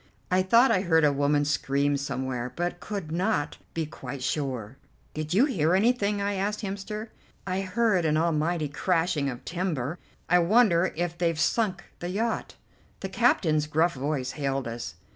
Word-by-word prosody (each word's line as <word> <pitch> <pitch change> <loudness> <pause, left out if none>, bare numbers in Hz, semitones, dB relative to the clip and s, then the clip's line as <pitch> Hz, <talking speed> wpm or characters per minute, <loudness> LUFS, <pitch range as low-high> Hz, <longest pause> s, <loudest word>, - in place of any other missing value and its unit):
I 185 +1 +4
thought 230 +8 +5
I 185 - +3
heard 160 -4 +3
a 145 - +4
woman 145 +1 +2
scream 140 0 +1
somewhere, 130 -3 -3
but 175 +1 -2
could 195 -7 -5
not 180 -2 -1 0.2
be 165 -1 -1
quite 135 -3 -7
sure. 130 -5 -3 0.4
"Did 155 +3 -3
you 240 +7 +6
hear 180 - +1
anything?" 210 -1 +2
I 200 0 0
asked 205 +3 -2
Hemster. 210 +2 -5 0.4
"I 185 0 -1
heard 195 -1 +1
an 155 -1 +2
almighty 160 0 +1
crashing 165 -1 0
of 125 0 -8
timber. 170 -4 -2 0.3
I 180 +1 +5
wonder 185 -1 +4
if 170 0 -3
they've 165 -2 +1
sunk 190 +1 +1 0.2
the 175 - -4
yacht." 220 +5 -2 0.5
The 195 - -4
captain's 165 -9 +2
gruff 160 +3 +2
voice 135 -1 -2
hailed 135 -3 -2
us. 115 -8 -6
170 Hz, 160 wpm, -27 LUFS, 145-195 Hz, 0.5 s, you